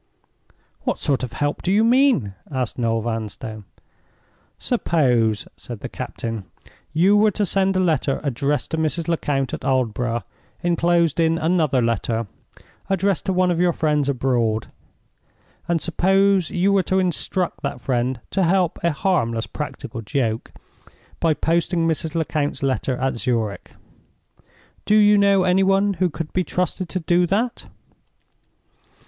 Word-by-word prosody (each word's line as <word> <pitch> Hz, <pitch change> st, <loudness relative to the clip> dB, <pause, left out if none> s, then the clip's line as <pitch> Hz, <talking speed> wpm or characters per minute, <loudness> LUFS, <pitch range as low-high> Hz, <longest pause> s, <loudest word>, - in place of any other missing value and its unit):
"What -, -, -1 dB
sort 140 Hz, -2 st, 0 dB
of 125 Hz, -2 st, -5 dB
help 145 Hz, 0 st, -2 dB
do 180 Hz, -, -1 dB
you 210 Hz, +3 st, +4 dB
mean?" 240 Hz, -, +3 dB, 0.2 s
asked 130 Hz, -4 st, -3 dB
Noel 115 Hz, -1 st, +1 dB
Vanstone. 110 Hz, -1 st, -5 dB, 0.9 s
"Suppose," 125 Hz, -, +1 dB
said -, -, -9 dB
the -, -, -5 dB
captain, 115 Hz, -4 st, -5 dB, 0.5 s
"you 180 Hz, +7 st, +4 dB
were 210 Hz, +1 st, +5 dB
to 205 Hz, +1 st, -1 dB
send 195 Hz, 0 st, +1 dB
a -, -, +2 dB
letter 155 Hz, -7 st, +1 dB
addressed 140 Hz, +1 st, -1 dB
to 160 Hz, -, -1 dB
Mrs. 160 Hz, +2 st, -1 dB
Lecount 145 Hz, -5 st, -1 dB
at -, -, -5 dB
Aldborough, 120 Hz, -3 st, 0 dB, 0.4 s
inclosed 170 Hz, -2 st, +2 dB
in 165 Hz, 0 st, +3 dB
another 155 Hz, -6 st, +1 dB
letter 115 Hz, 0 st, -1 dB, 0.6 s
addressed 195 Hz, -1 st, +1 dB
to 190 Hz, -, +1 dB
one 180 Hz, 0 st, +2 dB
of 170 Hz, -, -1 dB
your 175 Hz, -1 st, +3 dB
friends 150 Hz, -3 st, +1 dB
abroad? 120 Hz, -5 st, 0 dB, 1.0 s
And 170 Hz, -1 st, +1 dB
suppose 190 Hz, +1 st, +2 dB
you 190 Hz, +3 st, +1 dB
were 195 Hz, -, +4 dB
to 190 Hz, +1 st, 0 dB
instruct 180 Hz, 0 st, -1 dB
that 140 Hz, -3 st, -3 dB
friend 125 Hz, -1 st, -1 dB
to 195 Hz, -, +1 dB
help 180 Hz, 0 st, +2 dB
a 170 Hz, -, +3 dB
harmless 120 Hz, -9 st, 0 dB
practical 140 Hz, -5 st, -6 dB
joke 115 Hz, -1 st, -2 dB, 0.7 s
by 165 Hz, -2 st, +2 dB
posting 165 Hz, +1 st, +1 dB
Mrs. 160 Hz, -1 st, -1 dB
Lecount's 155 Hz, -3 st, -1 dB
letter 130 Hz, -1 st, 0 dB
at 130 Hz, -1 st, -1 dB
Zurich? 115 Hz, -6 st, -2 dB, 1.2 s
Do 210 Hz, -, +3 dB
you 210 Hz, -1 st, +6 dB
know 200 Hz, -2 st, +4 dB
any 185 Hz, +1 st, +3 dB
one 195 Hz, +1 st, +3 dB
who 185 Hz, -1 st, +2 dB
could 160 Hz, 0 st, -6 dB
be 185 Hz, -, +1 dB
trusted 180 Hz, 0 st, -2 dB
to 185 Hz, -, -2 dB
do 175 Hz, +1 st, +2 dB
that?" 225 Hz, +6 st, -1 dB
160 Hz, 145 wpm, -22 LUFS, 125-185 Hz, 1.2 s, you